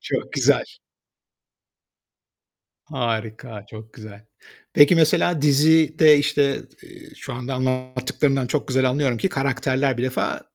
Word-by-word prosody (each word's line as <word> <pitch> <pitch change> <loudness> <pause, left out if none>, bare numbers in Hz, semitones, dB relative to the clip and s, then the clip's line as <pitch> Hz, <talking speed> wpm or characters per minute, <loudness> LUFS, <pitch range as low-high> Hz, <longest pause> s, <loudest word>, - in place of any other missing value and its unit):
Çok - - -5
güzel. - - +2 2.3
Harika, 110 -2 -5
çok 110 0 -13
güzel. 110 -1 -13 0.5
Peki 145 +4 +6
mesela 160 0 +2
dizide, 155 +1 +4
işte, 145 -1 0 0.2
eee, - - -15
şu - - -9
anda 125 +2 -6
anlattıklarından 130 +1 -2
çok 145 +3 -3
güzel 130 0 +1
anlıyorum 130 -2 -1
ki 190 - -1
karakterler 135 -2 -1
bir 120 - -3
defa 130 -1 -3
130 Hz, 115 wpm, -21 LUFS, 125-145 Hz, 2.3 s, Peki